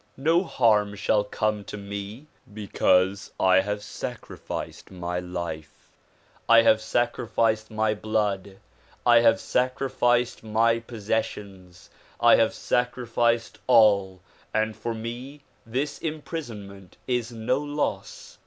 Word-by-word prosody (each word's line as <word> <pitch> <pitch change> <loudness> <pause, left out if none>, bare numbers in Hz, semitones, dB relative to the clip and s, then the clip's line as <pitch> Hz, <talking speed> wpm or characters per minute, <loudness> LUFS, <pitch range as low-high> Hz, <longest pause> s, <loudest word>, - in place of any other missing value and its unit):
No 165 +6 +3
harm 105 - +2
shall 105 +1 +1
come 105 0 -2
to - - -7
me 100 +5 -7 0.3
because 100 -2 +1
I 95 0 +5
have 105 +2 -2
sacrificed 105 - -7
my 90 -1 -4
life, 85 -3 -7 0.6
I 115 0 +8
have 110 -1 +4
sacrificed 115 -1 0
my 110 0 0
blood, 105 -2 -2 0.5
I 120 -1 +7
have 115 -1 +4
sacrificed 125 -1 0
my 115 +1 +2
possessions, 105 -5 -5 0.3
I - - +6
have - - +2
sacri 125 0 -1
ficed 115 0 0
all 100 -4 +4 0.3
and 110 0 0
for 115 -1 -4
me 120 +6 -7 0.3
this 140 +5 -2
imprisonment 115 - -7
is 125 -2 -1
no 115 +3 -1
loss." 145 0 -4
110 Hz, 115 wpm, -25 LUFS, 100-120 Hz, 0.6 s, I